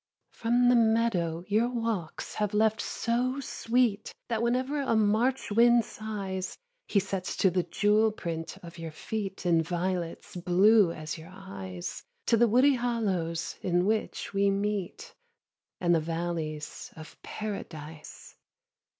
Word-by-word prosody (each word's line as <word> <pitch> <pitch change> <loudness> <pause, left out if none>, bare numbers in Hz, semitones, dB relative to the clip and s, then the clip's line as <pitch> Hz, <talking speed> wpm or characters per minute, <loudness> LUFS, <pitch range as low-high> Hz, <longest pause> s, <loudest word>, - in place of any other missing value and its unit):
From 240 +2 +2
the 245 - +6
meadow 220 -8 +2
your 220 +4 +2
walks 225 -9 -3
have 210 -1 -1
left 220 0 +3
so 250 +3 -1
sweet 235 -4 0 0.2
That 225 -2 0
whenever 255 +5 0
a 265 -4 +1
March 220 +4 +2
wind 235 +2 +5
sighs 195 -3 -5 0.3
He 200 - +3
sets 195 -1 -3
the 185 -1 +3
jewel 210 +5 +2
print 165 -5 -5
of 170 0 -10
your 165 -1 -5
feet 195 +4 -5
In 170 -2 +4
violets 175 +1 -3
blue 185 +2 +5
as 155 0 -6
your 160 +2 -11
eyes, 95 - -7 0.2
To - - +4
the 240 +1 +5
woody 255 +6 +5
hollows 200 -10 -1
in 175 0 +1
which 215 0 -1
we 200 0 +3
meet 205 - -2 0.7
And 175 -1 +3
the 165 - +4
valleys 160 -2 -4
of 155 0 -12
Paradise. 160 -7 -7
200 Hz, 135 wpm, -29 LUFS, 170-230 Hz, 0.7 s, the